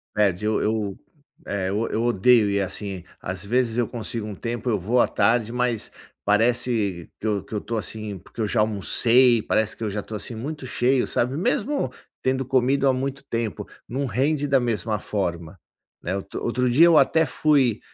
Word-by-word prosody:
Perde, 105 Hz, -2 st, +1 dB
eu 110 Hz, 0 st, +1 dB
eu 105 Hz, -2 st, -1 dB, 0.5 s
eh, 95 Hz, -2 st, -2 dB
eu 105 Hz, +4 st, -1 dB
eu 115 Hz, -, -1 dB
odeio 120 Hz, -1 st, +4 dB
ir 100 Hz, 0 st, +1 dB
assim. 95 Hz, -1 st, -4 dB, 0.2 s
Às 90 Hz, +2 st, -4 dB
vezes 120 Hz, +1 st, +1 dB
eu 120 Hz, -3 st, +1 dB
consigo 115 Hz, -2 st, -4 dB
um 105 Hz, -, -6 dB
tempo, 120 Hz, +3 st, -4 dB
eu 105 Hz, -4 st, +1 dB
vou 120 Hz, +7 st, +2 dB
à -, -, +3 dB
tarde, 115 Hz, -1 st, +1 dB
mas 125 Hz, -2 st, -1 dB, 0.3 s
parece 110 Hz, -4 st, +1 dB
que 110 Hz, -, -3 dB
eu 105 Hz, -3 st, 0 dB
que -, -, -12 dB
eu 105 Hz, -, 0 dB
estou, 115 Hz, +2 st, -4 dB
assim, 105 Hz, -2 st, -5 dB
porque 105 Hz, +5 st, -9 dB
eu 110 Hz, -, +1 dB
já -, -, 0 dB
almocei, 115 Hz, +3 st, +4 dB
parece 110 Hz, 0 st, 0 dB
que -, -, -6 dB
eu 110 Hz, -, -1 dB
já 105 Hz, +1 st, -3 dB
estou, 110 Hz, -, -8 dB
assim, 115 Hz, -, -6 dB
muito 140 Hz, +4 st, -6 dB
cheio, 125 Hz, +1 st, +1 dB
sabe, 125 Hz, +3 st, 0 dB
mesmo 245 Hz, -, 0 dB, 0.3 s
tendo 130 Hz, 0 st, 0 dB
comido 135 Hz, +2 st, +2 dB
há -, -, +5 dB
muito 135 Hz, +1 st, -3 dB
tempo, 115 Hz, -, -3 dB, 0.2 s
não 135 Hz, +3 st, -2 dB
rende 140 Hz, +5 st, 0 dB
da 135 Hz, -1 st, +4 dB
mesma 110 Hz, -3 st, -1 dB
forma, 85 Hz, -4 st, -3 dB, 0.5 s
né. 95 Hz, -, -2 dB
Outro 100 Hz, -, -6 dB
outro 125 Hz, +1 st, +1 dB
dia 160 Hz, +7 st, +7 dB
eu 165 Hz, -3 st, +6 dB
até 160 Hz, 0 st, +4 dB
fui 140 Hz, -8 st, +2 dB
115 Hz, 195 wpm, -24 LUFS, 105-125 Hz, 0.5 s, dia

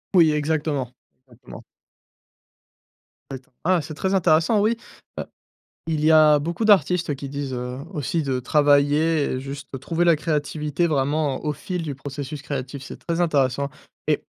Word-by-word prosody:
Oui, 165 Hz, -3 st, +6 dB
exactement, 150 Hz, -4 st, -1 dB, 0.4 s
exactement. 120 Hz, -1 st, -13 dB, 1.7 s
Ah 135 Hz, -, -3 dB
et -, -, -7 dB
t'en 130 Hz, -, -32 dB
ah, 180 Hz, 0 st, +3 dB
c'est 155 Hz, -, -7 dB
très 190 Hz, +5 st, -1 dB
intéressant, 170 Hz, +3 st, +3 dB
oui, 220 Hz, +3 st, +2 dB, 0.4 s
heu, -, -, -1 dB, 0.6 s
il 155 Hz, -2 st, 0 dB
y 160 Hz, -, +6 dB
a 155 Hz, -1 st, +7 dB
beaucoup 170 Hz, +9 st, -2 dB
d'artistes, 180 Hz, -5 st, +4 dB
heu, 145 Hz, -, 0 dB
qui 140 Hz, 0 st, -7 dB
disent, 140 Hz, -1 st, -4 dB
heu, 125 Hz, 0 st, -4 dB
aussi 160 Hz, 0 st, -1 dB
de 135 Hz, -3 st, -1 dB
travailler 145 Hz, +3 st, +3 dB
et 130 Hz, -, -2 dB
juste 135 Hz, 0 st, -7 dB
trouver 165 Hz, +6 st, 0 dB
la 170 Hz, -1 st, +6 dB
créativité 150 Hz, +1 st, -1 dB
vraiment, 145 Hz, -1 st, 0 dB
au 150 Hz, -, 0 dB
fil 180 Hz, +5 st, -4 dB
du 150 Hz, -4 st, -4 dB
processus 140 Hz, +1 st, -7 dB
créatif, 140 Hz, -1 st, -5 dB
c'est -, -, -9 dB
très 170 Hz, +1 st, 0 dB
intéressant 140 Hz, -4 st, +1 dB, 0.4 s
et -, -, +1 dB
150 Hz, 165 wpm, -23 LUFS, 140-165 Hz, 1.7 s, a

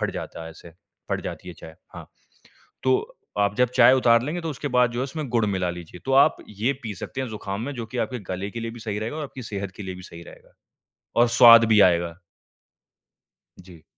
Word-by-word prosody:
फट -, -, -1 dB
जाता -, -, -7 dB
है 80 Hz, -, -8 dB
ऐसे, 85 Hz, +1 st, -14 dB, 0.4 s
फट -, -, -1 dB
जाती -, -, -7 dB
है 90 Hz, -, -8 dB
चाय। 80 Hz, 0 st, -12 dB, 0.2 s
हाँ, -, -, -9 dB, 0.8 s
तो 130 Hz, 0 st, 0 dB, 0.2 s
आप 100 Hz, 0 st, +2 dB
जब 125 Hz, 0 st, +3 dB
चाय 125 Hz, 0 st, +7 dB
उतार 115 Hz, -3 st, +4 dB
लेंगे 155 Hz, +7 st, -3 dB
तो 165 Hz, -1 st, -4 dB
उसके 145 Hz, 0 st, -5 dB
बाद 125 Hz, -1 st, +4 dB
जो 120 Hz, +1 st, -2 dB
इसमें 145 Hz, +1 st, -5 dB
गुड़ 115 Hz, -2 st, +2 dB
मिला 95 Hz, -3 st, -1 dB
लीजिए। 85 Hz, 0 st, -10 dB
तो 135 Hz, -, -2 dB
आप -, -, 0 dB
ये 105 Hz, +6 st, -1 dB
पी 110 Hz, -3 st, -5 dB
सकते 130 Hz, -, -6 dB
हैं 130 Hz, -, -3 dB
ज़ुकाम 105 Hz, -1 st, -5 dB
में 140 Hz, +4 st, -4 dB
जो 115 Hz, -3 st, -6 dB
कि 120 Hz, +3 st, -6 dB
आपके 125 Hz, -, -6 dB
गले 95 Hz, +2 st, -4 dB
के 115 Hz, -, -6 dB
लिए 115 Hz, 0 st, -4 dB
भी 120 Hz, 0 st, -11 dB
सही 105 Hz, -2 st, -4 dB
रहेगा 110 Hz, +7 st, -4 dB
और 155 Hz, -, -4 dB
आपकी 135 Hz, -2 st, -9 dB
सेहत 100 Hz, -3 st, -5 dB
के -, -, -7 dB
लिए 95 Hz, -1 st, -6 dB
भी 90 Hz, -, -11 dB
सही 85 Hz, -1 st, -11 dB
रहेगा -, -, -16 dB, 0.7 s
और 120 Hz, -, +5 dB
स्वाद 115 Hz, -1 st, +8 dB
भी 110 Hz, -1 st, +4 dB
आएगा। 85 Hz, -1 st, -2 dB, 1.5 s
जी। 90 Hz, -3 st, -15 dB
110 Hz, 230 wpm, -24 LUFS, 95-125 Hz, 1.5 s, स्वाद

